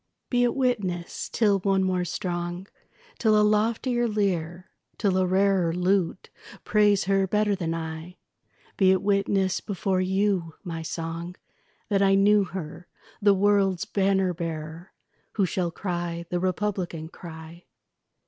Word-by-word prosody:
Be 245 -1 +3
it 240 - +1
witness, 205 -10 -2
till 205 -4 +2
one 195 0 +1
more 185 -1 0
strong, 175 +1 -4 0.5
Till 215 -2 +4
a - - +4
loftier 230 +3 +1
lyre, 180 -5 -2 0.3
till 200 -3 +1
a 185 0 +2
rarer 190 -2 +2
Lute 180 0 0 0.3
praise 205 -2 +3
her 195 0 +1
better 210 +1 +1
than 165 -4 -2
I, 160 +2 -6 0.6
Be 190 -2 +4
it 190 0 +3
witness 195 -1 +1
before 190 -2 -1
you, 190 -3 0
my 165 -3 -5
song, 165 +2 -5 0.5
That 200 -2 +2
I 195 0 +4
knew 205 +1 +4
her, 175 -1 -7 0.3
the 200 -1 +5
world's 195 -1 +2
banner 195 -3 +1
bearer, 165 +1 -6 0.4
Who 200 - +2
shall 180 -1 -1
cry 170 -1 -4
the 175 - 0
republican 185 -3 -2
cry. 165 0 -11
190 Hz, 135 wpm, -26 LUFS, 175-200 Hz, 0.6 s, the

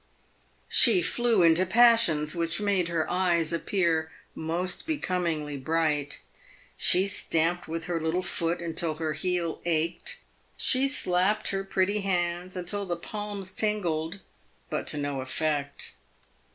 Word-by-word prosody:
She 365 -3 +7
flew 235 -6 +2
into 165 +2 +4
passions 205 -8 +4
which 165 +1 -1
made 200 -4 0
her 165 -2 -1
eyes 175 -3 0
appear 170 -2 0 0.2
most 170 - -2
becomingly 170 - -2
bright; 150 0 -1 0.5
she 185 +2 +4
stamped 175 -3 0
with 165 +1 -4
her 170 -2 -2
little 165 +3 -1
foot 170 -1 -1
until 165 -1 -2
her 155 -1 -3
heel 170 0 -2
ached; 170 - -2 0.3
she 260 +1 +5
slapped 205 -4 +1
her 195 0 -2
pretty 195 +2 0
hands 180 -1 -2
until 190 +3 -3
the 175 - -2
palms 205 0 -6
tingled, 190 -4 -2 0.5
but - - -3
to - - -1
no 145 -2 -3
effect. 140 +2 -3
175 Hz, 125 wpm, -27 LUFS, 160-195 Hz, 0.5 s, She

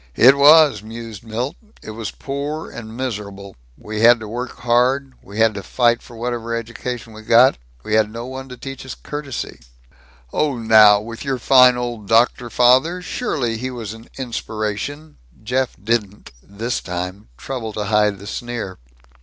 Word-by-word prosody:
"It 130 +3 +7
was," 145 -5 +6
mused 115 -1 -9
Milt. 120 +7 -3 0.3
"It - - -7
was 110 -2 -5
poor 145 +3 -5
and 110 0 -9
miserable. 100 -6 -5 0.2
We 110 0 -5
had 120 +1 +7
to 110 - -6
work 120 +3 -5
hard 125 +3 +2
we 100 +2 -11
had 110 0 +4
to 100 - -5
fight 120 +4 +2
for 120 - -14
whatever 115 0 -3
education 115 0 -6
we 110 - -10
got 115 - +5 0.2
we - - -4
had 110 -1 +3
no 115 +2 -6
one 130 +1 -7
to 125 - -9
teach 135 +1 -8
us 130 -2 -7
courtesy." 145 -4 -6 0.7
"Oh 145 -4 0
now, 110 -2 +6
with 115 +2 -8
your 135 -2 -1
fine 125 -1 +6
old 120 -4 -4
doctor 120 +2 +3
father? 130 - +4
Surely 125 - -2
he 130 +3 -4
was 115 -5 -6
an 115 +1 -14
inspiration?" 120 +4 -4 0.3
Jeff 125 +3 -1
didn't, 105 -1 -2
this 110 - -4
time, 90 -1 -5
trouble 125 -5 -5
to 105 - -3
hide 105 -1 +2
the 100 - -12
sneer. 115 - -5
115 Hz, 165 wpm, -20 LUFS, 110-130 Hz, 0.7 s, It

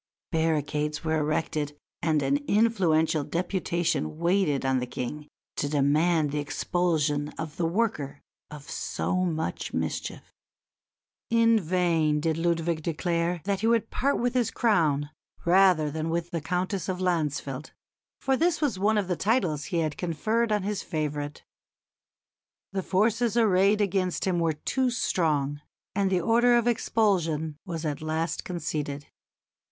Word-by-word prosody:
Barricades 150 -2 0
were 160 0 +1
erected 150 -1 -1 0.2
and 155 -3 +1
an 135 +1 +2
influential 175 -8 +2
deputation 170 - -1
waited 170 -5 +1
on 130 -1 +2
the 125 - -3
King 145 +5 -5 0.3
to 145 - -1
demand 150 +2 +2
the 150 - -1
expulsion 150 -1 0
of 160 -1 -6
the 170 - +1
worker 165 -8 -1 0.3
of 150 -2 -10
so 185 - -2
much 165 -3 -2
mischief. - - -4 1.0
In 230 -1 +4
vain 165 -4 +1
did 160 +1 0
Ludwig 165 -1 0
declare 170 +1 -1
that 200 -1 -1
he 220 - +1
would 230 -1 +2
part 280 +2 +1
with 245 +1 0
his 245 -3 +1
crown 155 - +1 0.3
rather 175 -4 +4
than 160 +2 -3
with 170 +1 -2
the 170 -3 -2
Countess 185 +4 -2
of 185 - -1
Landsfeld 150 -6 -1 0.5
for 270 - +1
this 335 +4 +2
was 265 -11 0
one 210 +2 +3
of 200 -3 0
the 180 - 0
titles 180 - 0
he 170 -4 -1
had 155 -2 -2
conferred 215 +7 0
on 210 -2 +1
his 205 0 -2
favourite. 150 -3 -3 1.3
The 195 -1 -1
forces 220 +5 +1
arrayed 205 -1 +4
against 190 -2 0
him 180 -2 +1
were 165 -1 +1
too 255 - 0
strong, 150 - 0 0.3
and 195 0 +1
the 185 -2 +1
order 240 +5 +4
of 235 - +1
expulsion 170 -10 +1
was 165 -2 -4
at 150 0 -2
last 155 +1 -2
conceded. 150 -4 -4
170 Hz, 145 wpm, -27 LUFS, 150-195 Hz, 1.3 s, In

